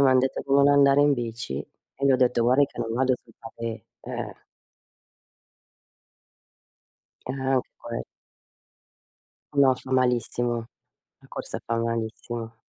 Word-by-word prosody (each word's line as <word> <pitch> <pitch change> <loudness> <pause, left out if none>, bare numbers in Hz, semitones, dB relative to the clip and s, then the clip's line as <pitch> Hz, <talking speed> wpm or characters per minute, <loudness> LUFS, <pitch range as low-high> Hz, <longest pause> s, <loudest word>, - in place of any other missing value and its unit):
m'han 130 -2 +6
detto 130 +1 0
di 135 - -2
non 140 0 +6
andare 140 0 +6
in 145 0 +5
bici 115 - -3
e 140 - -9
li 135 - +5
ho - - +5
detto: 125 -2 +3
"Guardi 130 +4 +4
che - - -16
non 115 -1 -2
vado 130 +1 +2
sul 115 - -21
pavé 115 0 -6 0.2
eh - - -9
eh.". - - -5 2.9
Ehm, 135 - -3
anche 130 -1 +2 0.2
quel 115 0 -5 1.5
No, 135 -2 +6
fa 130 +1 -11
malissimo. 120 -1 +1 0.6
La - - -20
corsa - - -5
fa 115 - 0
malissimo. 115 0 -3
125 Hz, 135 wpm, -26 LUFS, 115-135 Hz, 2.9 s, m'han